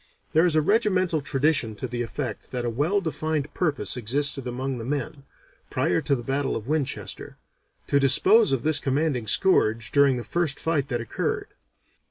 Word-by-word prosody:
There 160 +3 +4
is 165 - 0
a 155 - +3
regimental 185 -5 +1
tradition 135 -5 0
to 130 - -5
the 120 0 -4
effect 120 +3 -5
that 125 -1 -3
a 120 - -1
well 155 - 0
defined 155 -3 -3
purpose 145 - -1
existed 135 +3 +1
among 130 +1 -3
the - - -6
men, 140 +1 -4 0.4
prior 90 - 0
to 140 - +1
the 120 - -6
battle 135 +2 -1
of 110 - -6
Winchester, 150 -2 -3 0.5
to 140 - +2
dispose 190 - +5
of 135 -3 0
this 155 -1 +4
commanding 135 -4 -1
scourge 115 - +2
during 140 -3 +4
the 120 - -4
first 155 +3 -1
fight 155 -4 0
that 120 -4 -2
occurred. 115 - -3
140 Hz, 175 wpm, -25 LUFS, 125-155 Hz, 0.5 s, dispose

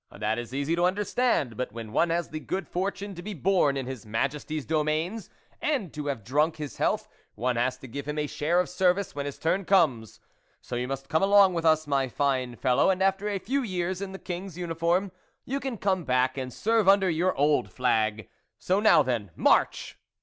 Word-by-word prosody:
That 110 +2 -2
is 120 0 -7
easy 140 +5 -1
to 175 +1 +2
understand; 195 - 0
but 125 0 -3
when 115 -2 -7
one 170 - +2
has 170 +1 -1
the 155 - -5
good 185 +2 -4
fortune 200 +2 -3
to 175 - -8
be 205 +2 -6
born 165 -4 +2
in 135 - -3
his 130 -2 -6
Majesty's 140 +7 -2
domains 160 +7 -1 0.3
and 265 - -1
to 150 -1 -5
have 135 -7 -3
drunk 150 +8 +1
his 150 -2 -7
health, - - 0 0.3
one 125 +2 -1
has 125 +2 0
to 130 - -11
give 140 +4 -6
him 150 0 -3
a 150 - 0
share 155 +4 0
of 180 - +1
service, 180 +2 +1
when 145 0 -4
his 140 - -6
turn 180 +5 0
comes. 145 - +2 0.4
So 125 - -7
you 125 +1 -2
must 135 0 -5
come 160 - +1
along 195 -1 +6
with 165 -1 -2
us, 155 -1 +4
my 140 -2 +1
fine 130 -2 -1
fellow, 125 +8 +2
and 190 0 +1
after 195 +2 +1
a 200 - -1
few 265 +8 -1
years 185 -4 -2
in 195 -1 -4
the 190 - -7
King's 180 -1 -6
uniform, 175 +2 0 0.3
you 275 +2 -2
can 265 -4 -4
come 190 -3 0
back 130 -1 +1
and 130 -2 -4
serve 220 - +2
under 195 -1 +5
your 175 +2 +1
old 145 +2 +2
flag. 110 -4 0 0.3
So, 185 +2 +1
now 175 -8 +6
then, 120 -6 -2
march! - - +1
160 Hz, 210 wpm, -27 LUFS, 130-190 Hz, 0.4 s, along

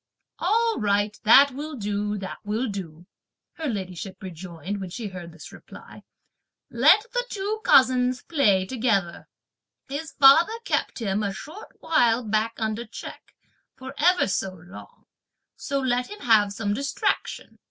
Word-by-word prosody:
"All 460 0 +1
right, 205 0 0
that 275 +6 +7
will 295 +3 -6
do! 205 -2 -2
that 190 -1 -7
will 220 +5 -2
do!" 175 -5 -7 0.5
her 320 -2 -5
ladyship 190 -4 -5
rejoined, 185 +2 -7
when 190 - -5
she 215 +3 -6
heard 180 -2 -9
this 160 -1 -12
reply; - - -13 0.7
"let 310 - +5
the - - 0
two 420 +2 -3
cousins 255 -1 +4
play 205 - +2
together; 210 -7 -1 0.6
his 285 +4 -6
father 320 +11 +6
kept - - -1
him 210 -3 -1
a 200 -1 -1
short 325 - -11
while 245 -7 +2
back 220 +1 0
under 220 +1 -2
check, - - -11 0.4
for 260 +1 -9
ever 355 +4 +3
so 195 -1 -2
long, 180 +2 -14 0.5
so 280 -1 -3
let 250 -1 -1
him 415 - -10
have 215 -4 +4
some 205 0 -2
distraction. 275 +5 -3
225 Hz, 140 wpm, -24 LUFS, 195-275 Hz, 0.7 s, that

